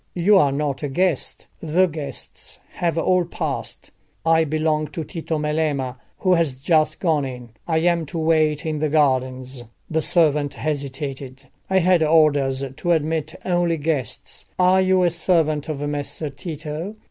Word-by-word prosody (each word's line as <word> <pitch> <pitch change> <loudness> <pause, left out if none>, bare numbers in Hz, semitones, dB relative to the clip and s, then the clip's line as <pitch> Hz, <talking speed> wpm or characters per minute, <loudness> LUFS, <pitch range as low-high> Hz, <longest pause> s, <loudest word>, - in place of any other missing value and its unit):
"You 185 +4 +4
are 145 -5 +3
not 140 -1 -2
a 145 - -2
guest; 175 +1 -1 0.2
the 170 +4 +3
guests 155 -4 -6
have 170 -2 -1
all 180 +2 +3
passed." 170 - -4 0.3
"I 165 0 +4
belong 155 0 0
to 165 - -5
Tito 160 0 -4
Melema, 150 -4 -1 0.2
who 185 -1 +2
has 165 -6 +2
just 155 +4 +1
gone 160 -5 +1
in. 125 -3 -7 0.2
I 160 -2 +1
am 170 -2 +1
to 165 - -6
wait 155 -2 +2
in 155 -1 -2
the 155 0 0
gardens." 130 -3 0 0.3
The 160 0 +1
servant 150 -4 +2
hesitated. 135 -2 -4 0.3
"I 190 - +3
had 180 -1 +4
orders 145 -4 +3
to 175 - -1
admit 155 0 -1
only 175 -2 +1
guests. 145 -6 -3
Are 185 +1 +4
you 185 0 +3
a 175 - +3
servant 160 -3 +1
of 145 -1 -3
Messer 145 +1 -3
Tito?" 155 +5 -6
155 Hz, 155 wpm, -22 LUFS, 145-170 Hz, 0.3 s, You